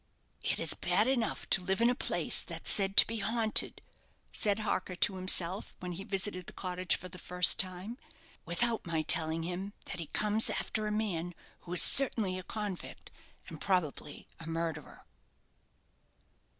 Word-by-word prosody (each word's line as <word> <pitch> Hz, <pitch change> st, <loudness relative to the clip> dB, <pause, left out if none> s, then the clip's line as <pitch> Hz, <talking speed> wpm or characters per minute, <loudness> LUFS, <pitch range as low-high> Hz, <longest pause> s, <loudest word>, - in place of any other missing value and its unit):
"It -, -, -2 dB
is -, -, +3 dB
bad 215 Hz, -, 0 dB
enough 255 Hz, -4 st, -1 dB
to 195 Hz, -, +6 dB
live 190 Hz, +2 st, -2 dB
in 235 Hz, -, +3 dB
a -, -, +1 dB
place 250 Hz, -, 0 dB
that's -, -, -5 dB
said 195 Hz, -1 st, -1 dB
to -, -, +11 dB
be 230 Hz, -, -5 dB
haunted," 220 Hz, +1 st, +1 dB, 0.5 s
said 205 Hz, -2 st, 0 dB
Harker 185 Hz, -3 st, -3 dB
to 190 Hz, +2 st, +2 dB
himself, 185 Hz, +1 st, -1 dB
when 180 Hz, -1 st, -6 dB
he 180 Hz, +3 st, -7 dB
visited 195 Hz, -3 st, -2 dB
the -, -, -9 dB
cottage 180 Hz, -1 st, -1 dB
for 185 Hz, -, -8 dB
the 180 Hz, 0 st, -12 dB
first 180 Hz, 0 st, +2 dB
time; 190 Hz, +6 st, -3 dB, 0.4 s
"without 225 Hz, +7 st, -1 dB
my 160 Hz, -2 st, -2 dB
telling 160 Hz, +1 st, +2 dB
him 180 Hz, +4 st, -6 dB
that 180 Hz, -, -8 dB
he 165 Hz, -, -6 dB
comes 215 Hz, +5 st, 0 dB
after 215 Hz, -1 st, -1 dB
a -, -, -3 dB
man 175 Hz, -5 st, -3 dB, 0.2 s
who 175 Hz, -, -9 dB
is 180 Hz, -, +7 dB
certainly 215 Hz, -9 st, +5 dB
a -, -, -6 dB
convict, 205 Hz, -1 st, -7 dB, 0.4 s
and -, -, -11 dB
probably 165 Hz, -6 st, -3 dB
a 160 Hz, -, -10 dB
murderer." 165 Hz, -2 st, -5 dB
185 Hz, 165 wpm, -30 LUFS, 175-210 Hz, 0.5 s, to